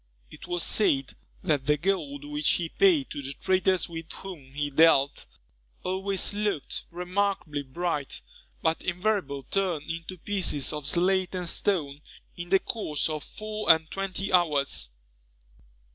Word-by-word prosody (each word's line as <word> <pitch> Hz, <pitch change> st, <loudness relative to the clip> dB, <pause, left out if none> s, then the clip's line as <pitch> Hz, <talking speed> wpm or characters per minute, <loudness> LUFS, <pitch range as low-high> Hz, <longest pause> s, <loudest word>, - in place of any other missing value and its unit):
It -, -, -11 dB
was 175 Hz, -1 st, 0 dB
said, 135 Hz, -11 st, +2 dB, 0.3 s
that 145 Hz, -4 st, 0 dB
the 150 Hz, 0 st, +4 dB
gold 150 Hz, -5 st, -1 dB
which 150 Hz, 0 st, +1 dB
he 170 Hz, -2 st, -1 dB
paid 340 Hz, -, +3 dB
to 145 Hz, -, -4 dB
the 135 Hz, 0 st, -5 dB
traders 185 Hz, +2 st, +2 dB
with 165 Hz, -1 st, -7 dB
whom 160 Hz, -9 st, -9 dB
he 145 Hz, 0 st, -1 dB
dealt, 140 Hz, -2 st, +4 dB, 0.6 s
always 190 Hz, +2 st, 0 dB
looked 205 Hz, -8 st, -1 dB
remarkably 180 Hz, -3 st, -1 dB
bright, 145 Hz, +1 st, -3 dB, 0.4 s
but 160 Hz, 0 st, +1 dB
invariably 180 Hz, -, -1 dB
turned 175 Hz, -6 st, 0 dB
into 165 Hz, +3 st, -6 dB
pieces 175 Hz, -7 st, 0 dB
of 150 Hz, -2 st, -5 dB
slate 185 Hz, +3 st, +2 dB
and 180 Hz, -1 st, -3 dB
stone 155 Hz, -7 st, +1 dB, 0.3 s
in 175 Hz, 0 st, -6 dB
the 195 Hz, -, +6 dB
course 160 Hz, -8 st, -2 dB
of 155 Hz, -1 st, -3 dB
four 215 Hz, -2 st, +1 dB
and 160 Hz, 0 st, +2 dB
twenty 195 Hz, 0 st, -3 dB
hours. 145 Hz, -, +2 dB
170 Hz, 140 wpm, -28 LUFS, 150-190 Hz, 0.6 s, the